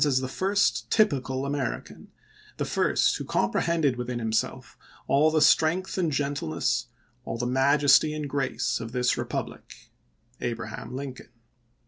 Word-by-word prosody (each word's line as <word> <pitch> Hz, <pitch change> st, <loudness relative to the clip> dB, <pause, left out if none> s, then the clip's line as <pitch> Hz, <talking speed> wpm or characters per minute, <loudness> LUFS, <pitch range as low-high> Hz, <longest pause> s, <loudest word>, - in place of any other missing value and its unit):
as 140 Hz, -4 st, +3 dB
the 130 Hz, -, -3 dB
first 195 Hz, +8 st, 0 dB
typical 135 Hz, -, +1 dB
American, 140 Hz, -4 st, -4 dB, 0.5 s
the -, -, -1 dB
first -, -, +1 dB
who -, -, -5 dB
com 105 Hz, -, 0 dB
prehended 160 Hz, -7 st, +1 dB
within 125 Hz, 0 st, -3 dB
himself 110 Hz, -2 st, -2 dB, 0.3 s
all 145 Hz, +3 st, +4 dB
the 155 Hz, -1 st, +1 dB
strength 165 Hz, +4 st, +3 dB
and 175 Hz, -4 st, 0 dB
gentleness, 140 Hz, -, -1 dB, 0.4 s
all 115 Hz, -, -4 dB
the 120 Hz, -, -2 dB
majesty 140 Hz, +3 st, +4 dB
and 150 Hz, -1 st, -4 dB
grace 140 Hz, -1 st, -1 dB
of 115 Hz, 0 st, -7 dB
this 125 Hz, -1 st, +1 dB
republic -, -, -6 dB, 0.2 s
— 120 Hz, -, -34 dB
Abraham 115 Hz, +1 st, -5 dB
Lincoln." 135 Hz, -1 st, -7 dB
135 Hz, 140 wpm, -26 LUFS, 125-150 Hz, 0.5 s, all